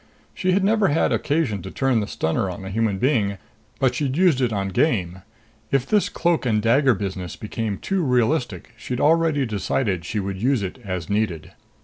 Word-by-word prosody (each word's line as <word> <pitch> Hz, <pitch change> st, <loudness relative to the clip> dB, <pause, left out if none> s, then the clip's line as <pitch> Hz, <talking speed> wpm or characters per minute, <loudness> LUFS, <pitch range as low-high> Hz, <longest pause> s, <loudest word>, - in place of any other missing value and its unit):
She 185 Hz, -1 st, 0 dB
had 195 Hz, +1 st, +2 dB
never 210 Hz, 0 st, +3 dB
had 155 Hz, +3 st, +2 dB
occasion 145 Hz, -, 0 dB
to -, -, -7 dB
turn 135 Hz, -4 st, +1 dB
the 105 Hz, -, -2 dB
stunner 80 Hz, +4 st, -1 dB
on 95 Hz, +1 st, -7 dB
a 95 Hz, -, -6 dB
human 110 Hz, -1 st, 0 dB
being, 105 Hz, -5 st, +1 dB, 0.4 s
but 130 Hz, -2 st, +2 dB
she'd 135 Hz, +1 st, -2 dB
used 175 Hz, -7 st, +4 dB
it 125 Hz, -2 st, +1 dB
on 100 Hz, -2 st, -1 dB
game. 95 Hz, -, 0 dB, 0.5 s
If 135 Hz, -2 st, +1 dB
this 210 Hz, +6 st, +2 dB
cloak 170 Hz, -1 st, 0 dB
and 110 Hz, -4 st, +1 dB
dagger 125 Hz, +4 st, +3 dB
business 95 Hz, -3 st, -5 dB
became 105 Hz, -1 st, -4 dB
too 195 Hz, -1 st, -1 dB
realistic, 125 Hz, -, 0 dB
she'd 120 Hz, +2 st, -5 dB
already 160 Hz, -3 st, +3 dB
decided 100 Hz, -3 st, -1 dB
she 105 Hz, +5 st, -3 dB
would 95 Hz, -1 st, -4 dB
use 130 Hz, -3 st, +2 dB
it 95 Hz, +7 st, -5 dB
as 90 Hz, -4 st, -4 dB
needed. 100 Hz, -6 st, -2 dB
115 Hz, 190 wpm, -23 LUFS, 100-145 Hz, 0.5 s, used